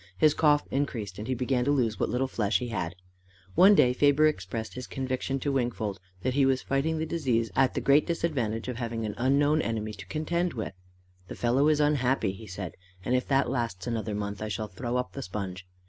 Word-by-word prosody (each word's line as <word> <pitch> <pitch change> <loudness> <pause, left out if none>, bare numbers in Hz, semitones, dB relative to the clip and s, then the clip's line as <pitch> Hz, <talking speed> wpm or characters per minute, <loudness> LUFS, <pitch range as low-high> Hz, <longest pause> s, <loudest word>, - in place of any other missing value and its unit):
His 155 +6 +5
cough 150 -2 +4
increased, 115 -9 -2
and 110 - -5
he 130 - 0
began 125 0 0
to 135 - 0
lose 120 -7 +1
what - - 0
little 130 +2 0
flesh 105 -5 +1
he 120 +4 -4
had. 90 -6 -3 0.6
One 195 - +7
day 125 -8 +5
Faber 145 +3 +4
expressed 110 -5 -2
his 125 0 -7
conviction 130 +1 -2
to 145 - 0
Wingfold 120 -6 -1 0.2
that 130 - 0
he 140 +1 +3
was 135 -1 +2
fighting 145 +4 0
the 160 - -1
disease 125 - 0
at 135 0 +3
the - - 0
great 140 +2 +4
disadvantage 135 -11 -1
of 125 -2 -4
having 115 -2 -3
an 105 - -3
unknown 145 +4 +3
enemy 110 -3 -2
to 100 -2 -10
contend 170 - -1
with. 110 -4 -4 0.5
"The - - -7
fellow 125 +5 +2
is 155 -1 +3
unhappy," 135 -7 +2
he 105 +3 -10
said, 95 -2 -6 0.3
"and 125 - 0
if 125 - 0
that 135 0 +2
lasts 115 -8 -2
another 110 -3 -2
month, 100 0 -4
I 110 - -2
shall 105 +1 -3
throw 120 +6 -3
up 125 - -2
the 135 - -5
sponge. 95 -2 -5
125 Hz, 215 wpm, -28 LUFS, 110-140 Hz, 0.6 s, One